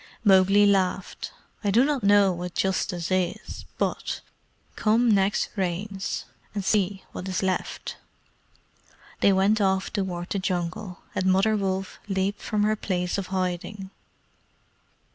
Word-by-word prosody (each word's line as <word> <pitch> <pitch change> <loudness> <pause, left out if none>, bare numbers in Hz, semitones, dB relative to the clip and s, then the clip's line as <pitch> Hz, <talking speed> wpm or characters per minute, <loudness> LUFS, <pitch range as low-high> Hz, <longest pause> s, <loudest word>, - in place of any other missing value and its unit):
Mowgli 195 0 +6
laughed. 190 -2 0 0.3
"I 205 - +1
do 235 +6 +5
not 290 -3 0
know 200 -1 +5
what 175 0 -5
justice 185 -2 -1
is, 185 -2 -2
but - - -2 0.5
come 225 +2 +3
next 195 0 +2
Rains. 190 +1 -2 0.3
and 200 -2 -2
see 195 -1 +1
what 185 - -6
is 185 - -1
left." 190 -1 -2 1.2
They 200 - +5
went 195 +3 +3
off 190 -1 +1
toward 180 -3 -3
the 200 - 0
Jungle, 180 +1 -3
and 185 - -1
Mother 195 +4 +4
Wolf 195 -1 -2
leaped 195 +1 -1
from 210 -1 0
her 215 +1 +2
place 180 -2 -1
of 190 - -4
hiding. 190 +1 -3
195 Hz, 130 wpm, -26 LUFS, 185-205 Hz, 1.2 s, Mowgli